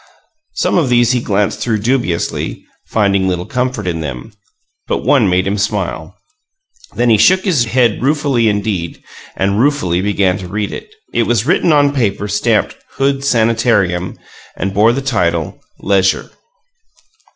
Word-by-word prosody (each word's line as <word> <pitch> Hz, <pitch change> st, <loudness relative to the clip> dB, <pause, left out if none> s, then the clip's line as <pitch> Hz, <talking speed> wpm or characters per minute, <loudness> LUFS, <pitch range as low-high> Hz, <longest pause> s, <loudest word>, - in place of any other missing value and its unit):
Some -, -, +1 dB
of 145 Hz, -6 st, 0 dB
these 120 Hz, -1 st, +3 dB
he 125 Hz, -2 st, 0 dB
glanced 105 Hz, -1 st, -1 dB
through 110 Hz, -1 st, -1 dB
dubiously, 115 Hz, -8 st, -2 dB, 0.2 s
finding 100 Hz, -3 st, +1 dB
little 90 Hz, -1 st, -2 dB
comfort 125 Hz, -5 st, -2 dB
in 85 Hz, -2 st, -2 dB
them; 70 Hz, -, -6 dB, 0.5 s
but -, -, -2 dB
one -, -, +3 dB
made 90 Hz, +1 st, +1 dB
him 100 Hz, +1 st, -1 dB
smile. 95 Hz, -4 st, -3 dB, 0.8 s
Then 120 Hz, -1 st, +2 dB
he 110 Hz, -, +4 dB
shook 190 Hz, -, +4 dB
his 155 Hz, -11 st, +2 dB
head 120 Hz, -2 st, +1 dB
ruefully 135 Hz, -4 st, +1 dB
indeed, 100 Hz, -5 st, -2 dB, 0.4 s
and 100 Hz, +2 st, 0 dB
ruefully 120 Hz, -11 st, +1 dB
began 100 Hz, -1 st, +1 dB
to 95 Hz, -, -7 dB
read 105 Hz, +2 st, -3 dB
it. 435 Hz, -, -8 dB, 0.2 s
It 120 Hz, -, +1 dB
was 115 Hz, -2 st, +1 dB
written 170 Hz, -, +2 dB
on 145 Hz, -1 st, +3 dB
paper 105 Hz, -6 st, -1 dB
stamped 105 Hz, +2 st, 0 dB, 0.2 s
"Hood 135 Hz, 0 st, 0 dB
Sanitarium," 115 Hz, -8 st, +1 dB, 0.4 s
and 95 Hz, 0 st, -3 dB
bore 105 Hz, +3 st, +4 dB
the 135 Hz, +3 st, -3 dB
title, 85 Hz, -11 st, -1 dB, 0.2 s
"Leisure." 95 Hz, -1 st, +1 dB
105 Hz, 150 wpm, -15 LUFS, 95-125 Hz, 0.8 s, he